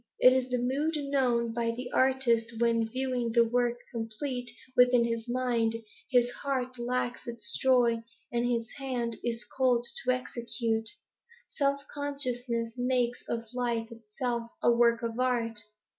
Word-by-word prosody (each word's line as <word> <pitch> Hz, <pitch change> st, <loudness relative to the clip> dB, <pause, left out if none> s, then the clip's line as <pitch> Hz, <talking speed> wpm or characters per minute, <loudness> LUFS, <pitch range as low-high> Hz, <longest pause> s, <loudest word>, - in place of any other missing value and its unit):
It 255 Hz, -, +8 dB
is 260 Hz, -1 st, 0 dB
the 250 Hz, -, +1 dB
mood 275 Hz, +6 st, 0 dB
known 255 Hz, -5 st, +1 dB
by 230 Hz, 0 st, 0 dB
the 245 Hz, +2 st, -4 dB
artist 235 Hz, -3 st, +2 dB
when, 230 Hz, -1 st, +2 dB
viewing 250 Hz, -2 st, -1 dB
the 235 Hz, 0 st, +5 dB
work 240 Hz, 0 st, +1 dB
complete 245 Hz, +2 st, -3 dB, 0.3 s
within 250 Hz, -1 st, +5 dB
his 230 Hz, 0 st, -3 dB
mind, 240 Hz, -2 st, +1 dB, 0.3 s
his 245 Hz, -2 st, +4 dB
heart 255 Hz, -2 st, -3 dB
lacks 245 Hz, 0 st, -2 dB
its 230 Hz, -2 st, -2 dB
joy 245 Hz, -3 st, +4 dB, 0.3 s
and 240 Hz, 0 st, 0 dB
his 235 Hz, -1 st, 0 dB
hand 245 Hz, -4 st, -1 dB
is 235 Hz, -1 st, -2 dB
cold 250 Hz, -2 st, +2 dB, 0.2 s
to 255 Hz, -, +3 dB
execute. 235 Hz, -3 st, -2 dB, 0.6 s
Self 280 Hz, -1 st, 0 dB
consciousness 250 Hz, -5 st, -2 dB
makes 245 Hz, -1 st, 0 dB
of 230 Hz, -1 st, -2 dB
life 235 Hz, -2 st, -1 dB
itself 230 Hz, +1 st, -4 dB
a -, -, +6 dB
work 235 Hz, 0 st, +3 dB
of 230 Hz, +1 st, -3 dB
art. 235 Hz, -3 st, +1 dB
240 Hz, 145 wpm, -29 LUFS, 230-255 Hz, 0.6 s, It